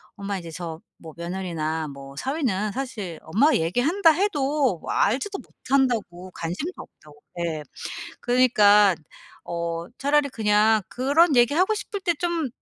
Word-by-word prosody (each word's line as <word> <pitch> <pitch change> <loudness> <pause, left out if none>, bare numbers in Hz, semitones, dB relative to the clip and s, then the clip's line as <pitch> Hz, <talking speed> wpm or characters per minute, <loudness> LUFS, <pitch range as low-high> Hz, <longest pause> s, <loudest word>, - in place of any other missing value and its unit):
엄마 200 -1 -4
인제 170 -2 -8
저 165 -1 -7 0.2
뭐 160 -1 -10
며느리나 170 -3 -3
뭐 140 -1 -10
사위는 220 - -1
사실 215 -11 -5
엄마가 230 - +3
얘기한다 290 - +3
해도 290 - +1
뭐 - - -5
알지도 390 - +1
못한다고 230 -10 -1
관심도 180 - -4
없다고 150 -1 -17 0.2
예 160 -3 -2 0.6
그러니깐 210 -6 +5 0.5
"어 170 0 -3
차라리 285 +1 +2
그냥 215 -1 +3
그런 285 +4 +3
얘기 240 +3 +4
하고 370 +6 +3
싶을 410 -1 -5
때 350 -3 +1
좀 335 -3 -1
215 Hz, 285 characters per minute, -24 LUFS, 170-285 Hz, 0.6 s, 그러니깐